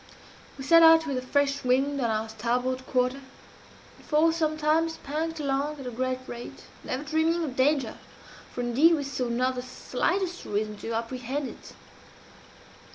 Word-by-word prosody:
"We 270 - -7
set 330 +5 +6
out 325 0 +7
with 275 -4 -2
a - - -6
fresh 280 +2 0
wind 270 +3 +1
on 235 - +1
our 220 0 -1
starboard 245 +4 -2
quarter, 255 +1 0 0.8
and - - -19
for 320 +2 +3
some 310 -2 0
time 310 +2 +2
spanked 320 +1 -4
along 285 +1 -1
at 270 - -8
a 250 - -4
great 255 +2 -1
rate, 240 -1 -9 0.2
never 260 +3 -3
dreaming 320 +3 +1
of 270 -5 -4
danger, 270 -3 +1 0.5
for 245 - -4
indeed 270 +8 +4
we 290 - -3
saw 260 -2 -3
not 255 +2 +1
the 250 - -4
slightest 350 +8 -2
reason 210 +1 -2
to 230 - -5
apprehend 255 +4 -3
it. - - -13
270 Hz, 165 wpm, -27 LUFS, 250-310 Hz, 0.8 s, out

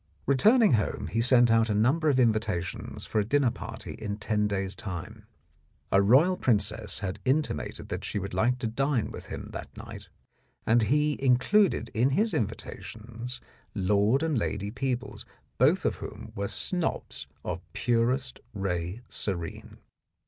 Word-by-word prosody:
Returning 215 - +5
home, 105 -2 0
he 115 - +1
sent 120 -1 +5
out 115 0 +4
a 105 - +1
number 140 +9 +3
of 135 -3 +3
invita 110 -6 +2
tions 95 - -6
for 110 - 0
a - - +2
dinner 130 +3 +2
party - - -7
in 105 -1 -5
ten 105 -1 0
days' 95 -1 -2
time. 105 +4 -7 0.6
A 100 - +5
royal 135 - +5
princess 105 -2 0
had 95 0 -3
intimated 130 - -1
that - - -4
she - - -3
would 100 -1 -4
like 120 +7 +2
to 125 - -4
dine 135 +1 0
with - - -9
him - - -7
that - - -8
night, - - -9 0.6
and 115 +2 +4
he 150 +6 +1
included 135 +11 +3
in 120 +4 +3
his 220 +1 +2
invita 110 -1 -3
tions 115 +4 -8 0.3
Lord 105 +7 +2
and 160 -2 +1
Lady 100 -1 -2
Peebles, 125 -3 -3 0.4
both - - +4
of - - +1
whom - - -8
were 100 0 -2
snobs 100 - -2 0.2
of - - -3
"purest 125 +3 0 0.2
ray 95 +1 -2
serene." 85 -5 -4
115 Hz, 155 wpm, -28 LUFS, 100-130 Hz, 0.6 s, Returning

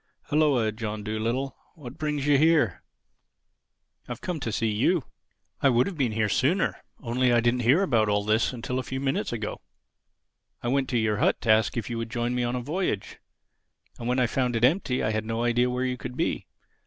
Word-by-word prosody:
"Hulloa, 145 -7 +3
John 110 -1 -5
Dolittle. 115 +5 -2 0.2
What 135 -6 -10
brings 150 -2 -1
you 145 -1 +4
here?" 160 0 +3 1.3
"I've - - -6
come 180 -3 -4
to 120 -5 -3
see 110 +1 0
you. 135 - +2 0.6
I 140 - +5
would 120 0 +3
have 200 - -4
been 130 -7 0
here 110 0 +1
sooner, 155 - +1 0.3
only 125 +1 +1
I 120 - +5
didn't 120 +1 +2
hear 130 +11 +4
about 115 - +2
all 105 0 +1
this 110 +2 +2
till 125 +1 -2
a - - 0
few 130 +1 -5
minutes 135 0 -1
ago. 110 -3 -4 1.0
I 120 - -1
went 135 0 +1
to 125 - +1
your 110 -2 +1
hut - - +2
to 110 - +3
ask 110 0 +3
you - - +1
if 110 - -8
you 115 - -2
would 115 -1 -4
join 120 0 -1
me 125 - 0
on 120 +1 -1
a 125 - -2
voyage; 145 - -3 0.8
and 115 - -5
when 125 +1 +1
I 125 - +3
found 125 0 0
it 115 - -1
empty 130 -3 +1
I 110 - +1
had 110 0 -1
no 115 +1 -2
idea 120 +1 +2
where 125 +1 -1
you 125 0 -2
could 125 +1 -7
be. - - -1
125 Hz, 215 wpm, -26 LUFS, 115-135 Hz, 1.3 s, I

